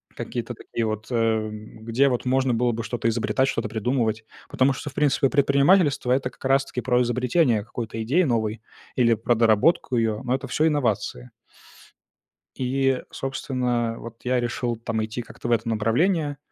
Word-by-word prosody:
какие-то - - -4
такие 115 - -4
вот, 110 0 -3
эм, 110 -2 -2
где 130 +4 +3
вот 125 0 -2
можно 130 0 +2
было 120 +1 +1
бы 115 0 -4
что-то 115 0 -2
изобретать, 115 +3 +1
что-то - - -2
придумывать, 115 -1 -1 0.2
потому 135 +1 +2
что, 145 +2 -6
в - - -15
принципе, 140 -1 +2
предпринимательство- 140 0 +3
это 130 0 +1
как - - -20
раз-таки 135 -2 +1
про 125 -1 +2
изобретение 125 -1 +1
какой-то 115 -1 -5
идеи 160 +11 +2
новой 110 -5 -1 0.3
или 115 -2 +4
про 115 +2 +1
доработку 115 +6 +3
её. 110 -1 0
Но 125 +1 0
это 135 0 -5
всё 155 +5 +1
инновации. 110 - -1 1.3
И, 135 0 +1
собственно, 125 -3 -2
вот 115 0 -9
я 125 0 +1
решил 120 0 -2
там 110 -1 -2
идти 110 +3 -5
как-то 120 +1 -8
в - - +1
это 115 0 +1
направление, 145 - +1
120 Hz, 165 wpm, -24 LUFS, 115-135 Hz, 1.3 s, или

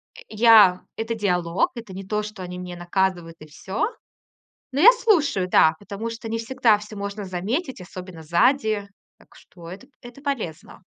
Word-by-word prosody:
Э, - - -12
я 215 -4 +6 0.2
это 225 +1 -2
диалог, 180 -4 0
это 225 -5 -9
не 195 +1 -7
то, 210 +2 -2
что 210 -2 -8
они 180 0 -7
меня 180 -1 -7
наказывают, 175 -1 -1
и 155 - -11
всё. 190 +6 -3 0.9
Но 275 - -1
я 455 +7 +10
слушаю, 320 - +1
да, 160 -2 +5
потому 205 +3 -6
что 225 0 -7
не 225 - -2
всегда 230 -2 +2
всё 210 +1 -10
можно 200 +1 -5
заметить, 210 - -3
особенно 180 -1 -10
сзади. 210 - +1 0.3
Так - - -23
что 170 -2 -14
это 200 +9 -11
п - - -37
это 245 +2 -13
полезно. 220 - -5
205 Hz, 175 wpm, -23 LUFS, 180-230 Hz, 0.9 s, я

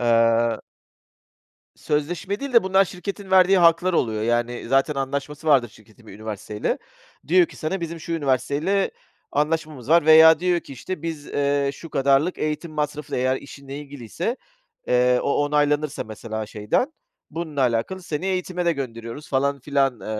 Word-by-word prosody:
Eee 115 -1 +3 1.2
Sözleşme 170 +7 -2
değil 280 -1 -5
de 235 - +6
bunlar 190 +1 +3
şirketin 195 +2 -7
verdiği 190 0 +6
haklar 170 +1 +4
oluyor. 110 -9 0
Yani 120 +1 -1
zaten 135 +3 +2
anlaşması 140 +3 -4
vardır 135 -5 +4
şirketin 110 +1 -20
bir - - -11
üniversiteyle. 105 0 -4 0.5
Diyor 180 0 +5
ki - - -15
sana, 175 +5 -3
"Bizim 170 0 -5
şu 165 - -5
üniversiteyle 150 +6 0 0.4
anlaşmamız 150 -3 -1
var," 165 -1 +4
veya 160 0 +8
diyor 180 -1 +1
ki, - - -12
işte, 155 +6 -6
"Biz, 160 -3 -5
eee, 140 0 0
şu 165 +3 -11
kadarlık 140 +6 +2
eğitim 155 +2 -3
masrafı 150 -1 -3
eğer 130 +1 +1
işinle 140 0 -9
ilgiliyse, 145 - -5 0.5
eee, 125 0 +4
o 145 +1 +1
onaylanırsa 150 0 0
mesela 110 0 -6
şeyden 105 - -1 0.4
bununla 160 -2 -4
alakalı 125 +10 0
seni 165 +1 -4
eğitime 180 -1 -2
de 170 - +3
gönderiyoruz 120 -1 -6
falan 140 +1 0
filan, 135 -3 0
eee, - - -9
145 Hz, 150 wpm, -23 LUFS, 125-170 Hz, 1.2 s, veya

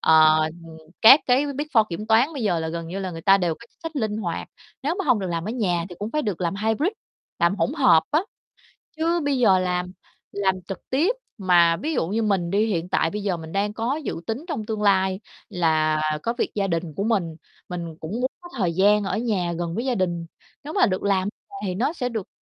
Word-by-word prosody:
ờ, 155 0 +6
ừm, 165 0 -8 0.3
các 265 +7 +10 0.4
Big 295 - -2
4 220 -2 +6
kiểm 185 +5 -5
toán 230 +8 +4
bây 275 -6 -4
giờ 180 -5 +1
là 160 - -3
gần 165 0 -5
như 190 +3 -4
là 190 -1 -3
người 165 -1 -8
ta 195 -1 +6
đều 175 -4 0
có - - -24
chính - - -39
sách 325 -1 -5
linh 215 -5 -1
hoạt. 180 -6 -4 0.3
Nếu 295 +5 0
mà 390 - -1
hông 250 -7 +3
được 190 - -3
làm 165 -1 -2
ở - - -1
nhà 180 -8 0
thì 175 - -9
cũng 210 +2 -4
phải 305 +3 0
được 205 - -3
làm 175 0 -1
hybrid, 220 - +1 0.5
làm 170 +2 +3
hỗn 255 - 0
hợp 250 - +5
á. 305 +2 +3 0.8
Chứ 335 +2 +1
bây 280 -2 +1
giờ 195 -6 +5
làm 180 0 -1 0.4
làm 195 -2 +1
trực 195 - -8
tiếp 330 - +2 0.2
mà 175 -3 +4
ví 310 - -3
dụ 165 - 0
như 215 +5 -1
mình 195 -5 0
đi, 210 +2 +3
hiện 180 -5 -2
tại 165 - +2
bây 210 +3 -4
giờ 185 -4 0
mình 160 0 -9
đang 205 +1 -1
có 235 +6 -1
dự - - -3
tính 240 +9 -3
trong 275 - -3
tương 215 -1 -3
lai 190 -2 +2 0.3
là 155 -5 +1 0.2
có 235 - 0
việc - - -1
gia 200 -2 0
đình 165 -2 -2
của 200 - -2
mình, 195 -8 0 0.3
mình 170 -3 -5
cũng 160 - -7
muốn 260 - 0
có 350 - -11
thời 180 -6 0
gian 205 +3 +4
ở 195 - -1
nhà 200 -7 -1
gần 170 -1 -3
với 235 +4 -2
gia 255 -3 0
đình. 175 -3 -1 0.4
Nếu 305 +3 -7
mà 390 - +4
được 185 -4 -1
làm 195 -1 +1 0.2
nhà - - -12
thì 185 -2 -2
nó 255 - 0
sẽ 250 -7 -2
được 220 -5 -4
195 Hz, 245 wpm, -24 LUFS, 170-230 Hz, 0.8 s, các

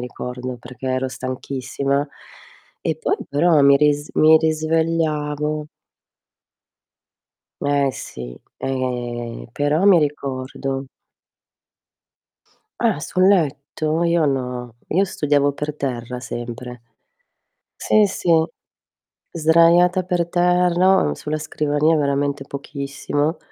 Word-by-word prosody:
ricordo, 125 0 -6
perché 125 +2 -10
ero 130 0 0
stanchissima 135 +2 -3 0.7
e 160 - -1
poi 160 - 0
però 155 +2 +3
mi 140 0 +7
ris 145 0 +1
mi 155 +1 +6
risvegliavo 155 -2 0 1.9
Eh 140 -1 +2
sì, 60 - -8 0.2
eh 120 - -4
però 150 +5 0
mi 190 -4 +7
ricordo. 135 -2 -3 1.9
Ah, 225 -9 +1
sul 185 +4 +1
letto? 155 -2 +1
Io 170 -2 +2
no. 125 -3 -3
Io 190 +5 +2
studiavo 145 -3 +1
per 150 +1 -4
terra 125 -3 -4
sempre. 120 0 -7 0.9
Sì, 215 -1 +3
sì, 180 -2 -1 1.0
sdraiata 170 +3 +4
per 180 -2 -1
terra, 180 +1 +3
on 75 - +1
sulla 150 - -4
scrivania 150 +1 +1
veramente 140 -1 0
pochissimo 140 +2 -3
145 Hz, 95 wpm, -21 LUFS, 130-160 Hz, 1.9 s, mi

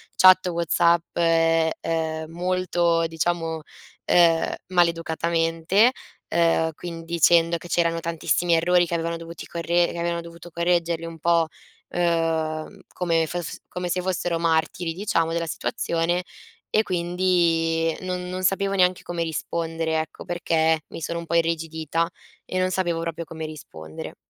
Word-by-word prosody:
chat 185 0 +7
WhatsApp, 170 0 +1
e, 165 -1 +3
ehm, 160 -1 -2
molto 175 -1 +1
diciamo, 165 0 -1 0.4
ehm, 165 -2 +4
maleducatamente, 170 +3 +2 0.4
ehm, 165 -1 +2
quindi 165 0 -8
dicendo 170 0 +4
che 175 - -11
c'erano 170 -1 +1
tantissimi 170 +1 0
errori, 175 +2 +3
che 170 - -5
avevano 165 0 -1
dovuti 165 0 -9
corre 170 +1 +1
che - - -7
avevano 170 0 -1
dovuto 170 +1 -11
correggerli 170 -1 0
un 165 -1 -8
po', 170 0 +3 0.4
uhm, 165 +1 -1
come 165 -2 +1
fes 175 0 -5
come 180 0 -4
se 180 +1 0
fossero 180 -2 -1
martiri 165 +1 0
diciamo 170 -4 0
della 170 0 -1
situazione, 175 -1 -1 0.5
e 215 - +3
quindi 170 -3 +1
non 180 -1 -4
non 185 0 -4
sapevo 195 +1 +1
neanche 180 -1 +2
come 170 -1 -3
rispondere 165 0 -2
ecco, 155 -1 -6
perché 160 -2 +1
mi - - -8
sono 170 +2 -3
un 170 - -7
po' 170 +1 -2
irrigidita 165 0 0 0.4
e 185 - -2
non 185 0 +1
sapevo 175 -3 -1
proprio 170 0 -4
come 160 0 -6
rispondere. 80 - -9
170 Hz, 140 wpm, -24 LUFS, 165-175 Hz, 0.5 s, chat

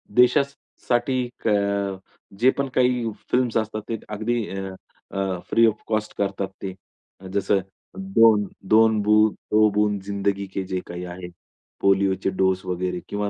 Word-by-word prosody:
देशासाठी 125 -1 +1 0.2
क - - +2 0.9
जे 130 - +6
पण 140 -1 0
काही 125 -3 +2 0.2
फिल्म्स 125 -2 +2
असतात, 110 -1 -2
ते 115 - -1
अगदी 110 +2 -1
अ, 95 -1 -5 0.4
अ, 95 -2 -2
फ्री 115 0 +5
ऑफ 110 - -1
कॉस्ट 110 -1 -1
करतात 100 -1 -1
ते. 95 -1 -4 0.6
जसं 100 0 +2 0.4
2-2 110 - +3
दो 105 0 +3
बूंद 105 -1 +1
जिंदगी 100 0 -1
के. 95 - -2
जे 95 0 -3
काही 90 +1 -6
आहे. 90 0 -8 0.5
पोलिओचे 95 -1 +2
डोस 95 0 +1
वगैरे 90 0 -2
किंवा 105 0 -2
105 Hz, 130 wpm, -23 LUFS, 95-115 Hz, 0.9 s, जे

